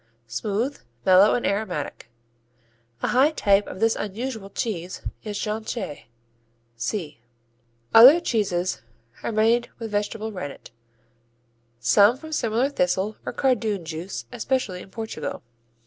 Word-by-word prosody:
Smooth, 210 - -2 0.3
mellow 190 +3 +6
and 245 - -1
aromatic. 185 - -3 0.9
A - - +1
high 265 +4 +5
type 205 -9 +2
of 185 - -8
this 225 +1 +3
unusual 220 0 -4
cheese 185 -4 -4 0.2
is 210 -2 -4
Jonchée 210 - -4 0.7
(see). 150 - -4 0.7
Other 260 +9 +10
cheeses 190 - -1 0.4
are - - -2
made 225 +2 +2
with 225 -2 -6
vegetable 210 +1 -2
rennet, 145 - -7 1.1
some 200 - +5
from 315 +3 -10
similar 235 -2 +1
thistle 190 -3 0
or - - -1
cardoon 220 -8 0
juice, 160 -6 -5
especially 250 -9 -2
in - - -12
Portugal. 220 - -5
210 Hz, 115 wpm, -24 LUFS, 185-230 Hz, 1.1 s, Other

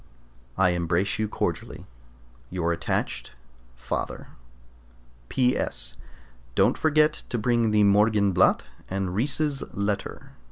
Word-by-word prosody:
I 95 -1 +4
embrace 85 +3 0
you 110 - +1
cordially. - - -3 0.6
Your 85 -2 -1
attached 85 - -3 0.4
FATHER. 65 +2 -4 1.0
P.S. 125 - 0 0.6
Don't - - +4
forget 155 -1 +2
to 120 - -1
bring 115 0 +2
the 105 -1 +4
"Morgenblatt" 100 -2 +4 0.3
and 95 -1 -2
Ries's 140 +6 +1
letter. 100 0 -3
100 Hz, 95 wpm, -26 LUFS, 90-120 Hz, 1.0 s, I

